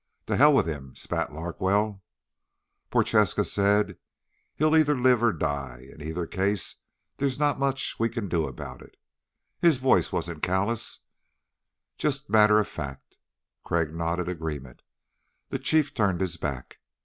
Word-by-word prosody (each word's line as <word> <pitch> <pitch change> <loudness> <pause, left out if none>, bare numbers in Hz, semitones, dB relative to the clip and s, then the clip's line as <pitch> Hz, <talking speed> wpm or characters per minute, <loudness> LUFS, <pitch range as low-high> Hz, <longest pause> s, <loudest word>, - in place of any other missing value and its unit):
"To - - -1
hell 150 +3 +7
with 135 - +4
him," 70 -5 -6
spat - - -2
Larkwell. 95 +6 -1 0.9
Prochaska - - +2
said, 100 -1 +1 0.6
"He'll 155 +1 +3
either 150 -3 +4
live 125 -2 +4
or 120 -1 +4
die. 70 - -4
In 75 - -14
either 80 +3 -3
case 95 +1 -1 0.4
there's 135 -2 0
not 145 -1 +1
much 135 -1 -1
we 115 0 +2
can 115 -4 -4
do 85 -3 0
about 65 - -8
it." - - -16 0.6
His 165 -5 +4
voice 130 +1 +3
wasn't 85 -2 -3
callous, 100 +6 0 1.0
just 145 -1 -2
matter 105 -1 +6
of 105 -1 +2
fact. 70 -8 -8 0.5
Crag 80 -2 0
nodded 85 +1 -2
agreement. 75 -7 -5 0.7
The - - -3
Chief 155 -2 +2
turned 100 -7 +1
his 90 -2 -2
back. 70 -6 -5
95 Hz, 140 wpm, -27 LUFS, 80-125 Hz, 1.0 s, hell